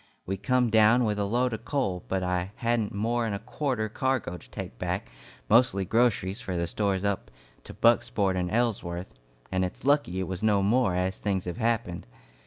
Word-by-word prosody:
We 95 - -2
come 120 +4 +1
down 110 +3 +5
with 105 -2 0
a 100 - +1
load 120 +4 +1
of 110 - -5
coal, 100 - -1
but 95 -1 -1
I 90 +2 -1
hadn't 115 -3 0
more 115 +3 0
'n 105 - -2
a - - -4
quarter 125 -1 -2
cargo 130 -4 -1
to 80 -8 -13
take - - -7
back, - - -3 0.4
mostly 110 -5 +4
groceries 110 -1 +1
for 95 -7 -3
the 85 - 0
stores 95 +2 -1
up 100 -1 -1 0.4
to - - -10
Bucksport 105 -4 +3
and 90 -1 -1
Ellsworth, 95 - -1 0.4
and 95 0 +1
it's 90 +6 -5
lucky 140 -11 +2
it 95 - -2
was 95 0 -4
no 105 -2 +3
more, 110 -2 +2
as 90 +1 -1
things 95 -3 -1
have 90 +2 -4
happened. 110 - -1
100 Hz, 190 wpm, -27 LUFS, 95-120 Hz, 0.4 s, down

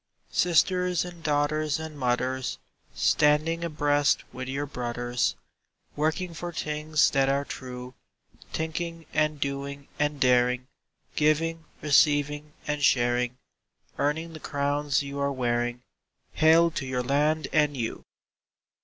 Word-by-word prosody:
Sisters 180 +1 +2
and 175 -1 -10
daughters 150 0 +1
and 160 -1 -7
mothers, 130 -1 -1 0.4
Standing 155 +3 +3
abreast 145 -3 +2
with 130 0 -6
your 140 +2 -2
brothers, 120 -2 -2 0.6
Working 160 +4 -1
for 175 +2 -5
things 155 -1 +1
that 135 -1 +2
are 140 +1 +1
true; 125 -1 -7 0.6
Thinking 165 +1 -4
and 150 -1 +1
doing 140 0 -4
and 150 -1 0
daring, 125 -1 +3 0.5
Giving, 160 +2 +1 0.2
receiving, 150 0 +3
and 150 -1 -2
sharing, 120 -1 +2 0.6
Earning 160 +4 -1
the 155 - -8
crowns 145 -1 0
you 140 0 -6
are 140 0 +1
wearing— 120 -1 -1 0.5
Hail 165 +2 +5
to 145 -4 -4
your 125 -1 -1
land 150 +3 +1
and 150 -2 +3
you! 115 -2 -3
145 Hz, 120 wpm, -27 LUFS, 130-155 Hz, 0.6 s, Hail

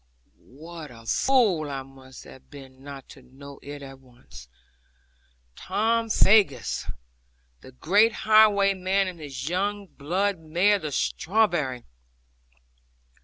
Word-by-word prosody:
What 160 +1 -10
a 115 -2 -15
fool 195 - +2
I 135 -1 -5
must 130 -1 -15
have 130 - -16
been 135 -2 -14
not 140 -2 -10
to 135 - -14
know 135 +2 -14
it 145 0 -9
at 135 -1 -11
once! 120 - -16 1.1
Tom 225 +1 -1
Faggus, 195 - +2 0.7
the 130 - -14
great 200 - +3
highwayman, 200 -3 +3
and 180 -2 -7
his 145 -2 -7
young 200 +4 -2
blood 185 +4 -2
mare, 175 +6 +1
the 155 -4 -5
strawberry! 160 - 0
155 Hz, 115 wpm, -25 LUFS, 135-200 Hz, 1.1 s, great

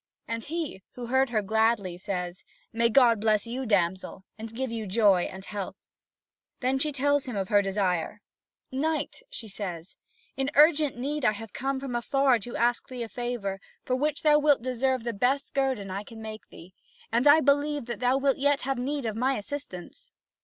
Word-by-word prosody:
And 230 0 -3
he, 315 - -4
who 245 - -6
heard 265 +2 +2
her 215 -3 0
gladly, 220 -3 +1
says: 180 -1 -4 0.3
"May 230 +1 +3
God 235 -3 +5
bless 215 -1 +2
you, 250 +2 -4
damsel, 190 -2 0
and 225 +1 -8
give 255 +2 -3
you 225 -2 -4
joy 195 -3 +4
and 190 +1 -8
health!" 200 -2 -5 0.8
Then 265 +1 +1
she 300 +2 +1
tells 285 0 +1
him 250 -4 -5
of 195 -2 -2
her 205 -1 +5
desire. 195 -1 -1 0.5
"Knight," 310 - -2
she 225 - -7
says, 185 -4 -6 0.4
"in 270 0 -1
urgent 300 -3 +5
need 285 +3 -3
I 215 - +4
have 225 +1 -9
come 270 +1 -2
from 265 -3 -4
afar 265 +1 +2
to 235 - -8
thee - - -4
to - - +1
ask 240 +2 0
a 245 -2 -4
favour, 230 -5 -3 0.3
for 255 - +1
which 295 +2 -1
thou 300 -1 +6
wilt 290 -4 +3
deserve 255 0 0
the 235 0 -2
best 255 +7 0
guerdon 260 -8 0
I 195 +2 -4
can 225 +1 -12
make 220 0 -8
to - - -52
thee; 180 +3 -14 0.4
and 240 +5 +3
I 290 +2 +8
believe 290 -1 +2
that 235 -3 -5
thou 250 +2 +3
wilt 275 -1 +2
yet 285 +1 +2
have 270 -1 -1
need 275 +1 -2
of 220 -2 -2
my 260 +4 +1
assistance." 240 - -8
240 Hz, 195 wpm, -27 LUFS, 210-275 Hz, 0.8 s, I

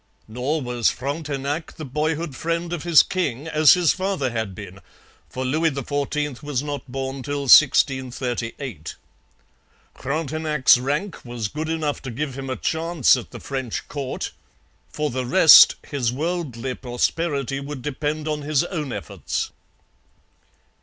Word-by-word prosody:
Nor 130 +7 -2
was 120 -2 +1
Frontenac 145 +2 -4
the 155 - -7
boyhood 150 +2 -2
friend 170 +2 -2
of 170 - -3
his 170 -2 +6
king 150 -6 -2
as 155 +2 +6
his 175 -3 +3
father 185 -9 -1
had 110 -4 -3
been, 95 -2 -10 0.5
for 130 0 -4
Louis 155 +5 +2
XIV 145 0 -3
was 145 -3 -2
not 145 -3 -6
born 135 0 -4
till 145 +1 -3
1638. 130 - +2 1.0
Frontenac's 150 -2 +2
rank 145 +9 -3
was 120 -3 -4
good 155 +5 -4
enough 155 -3 -2
to 135 - -6
give 135 +3 -4
him 135 0 -6
a 130 - -1
chance 165 -2 +2
at 125 - -6
the - - -9
French 130 -4 -4
court. 140 -3 -4 0.6
For 150 -2 -2
the 130 +1 -2
rest, 160 +3 +8
his 130 -5 -1
worldly 135 -4 -3
prosperity 135 +2 -1
would 140 -2 -7
depend 150 +2 -3
on 150 -1 -2
his 145 0 +1
own 155 -6 -4
efforts. - - -4
145 Hz, 140 wpm, -23 LUFS, 130-155 Hz, 1.0 s, rest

